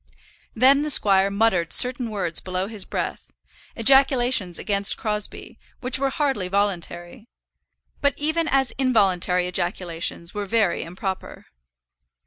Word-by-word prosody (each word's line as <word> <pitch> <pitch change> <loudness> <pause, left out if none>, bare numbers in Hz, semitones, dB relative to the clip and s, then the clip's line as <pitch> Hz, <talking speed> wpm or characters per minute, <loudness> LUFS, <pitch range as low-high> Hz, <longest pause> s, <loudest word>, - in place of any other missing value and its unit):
Then 265 +5 +4
the 300 - -3
squire 195 -7 +5
muttered 200 -5 0
certain 250 -1 +2
words 185 -6 -2
below 185 0 -4
his 205 -2 -6
breath, - - -5 0.4
ejaculations 245 - +3
against 200 0 +1
Crosbie, 210 -2 -5 0.2
which 255 0 -1
were 275 0 0
hardly 270 -9 -2
voluntary; 195 +2 -3 0.7
but 285 -1 +1
even 315 +2 -1
as 270 -2 +1
involuntary 190 -8 +1
ejaculations 175 -1 -3
were 205 -1 -5
very 210 -4 +1
improper. 185 +3 -7
205 Hz, 115 wpm, -22 LUFS, 185-255 Hz, 0.7 s, squire